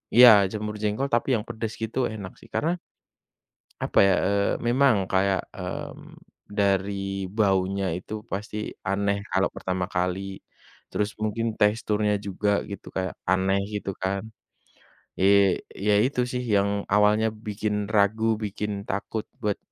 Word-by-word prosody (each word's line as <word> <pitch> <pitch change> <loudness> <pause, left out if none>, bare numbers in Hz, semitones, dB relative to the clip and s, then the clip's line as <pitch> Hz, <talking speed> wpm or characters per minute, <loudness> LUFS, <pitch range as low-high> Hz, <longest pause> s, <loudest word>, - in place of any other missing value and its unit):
iya 125 +1 +11 0.2
jamur 105 0 -3
jengkol 105 +5 0
tapi 120 - +2
yang 105 - -5
pedes 110 -2 -4
gitu 110 +3 -2
enak 100 -4 -7
sih - - -16
karena 170 +3 0 1.1
apa - - 0
ya, 100 -1 +6
eee, 100 +1 +2 0.2
memang 120 -5 +4
kayak, 95 -1 +3
mmm, - - -7 0.3
dari 100 -1 0
baunya 100 -2 +2
itu 90 - -11 0.2
pasti 105 +2 -4 0.3
aneh 100 +1 +1
kalau 95 +1 +2
pertama 95 -1 -2
kali, 90 +1 0 0.7
terus 105 0 -1
mungkin 110 +2 -1
teksturnya 105 0 +2
juga 100 +2 0 0.2
gitu 100 -1 -8
kayak 95 -1 -1 0.2
aneh 95 +1 +2
gitu 100 -1 -3
kan, 95 +1 -1 1.0
eee, 100 -1 +4 0.2
iya 105 +1 +2
itu 130 -1 -1
sih 125 0 -2
yang 100 0 +3 0.2
awalnya 105 +1 +4 0.2
bikin 105 0 -2 0.2
ragu 105 +2 +3 0.2
bikin 105 +1 -3 0.2
takut 105 +2 -2 0.2
buat 105 -3 -1
100 Hz, 135 wpm, -26 LUFS, 95-110 Hz, 1.1 s, iya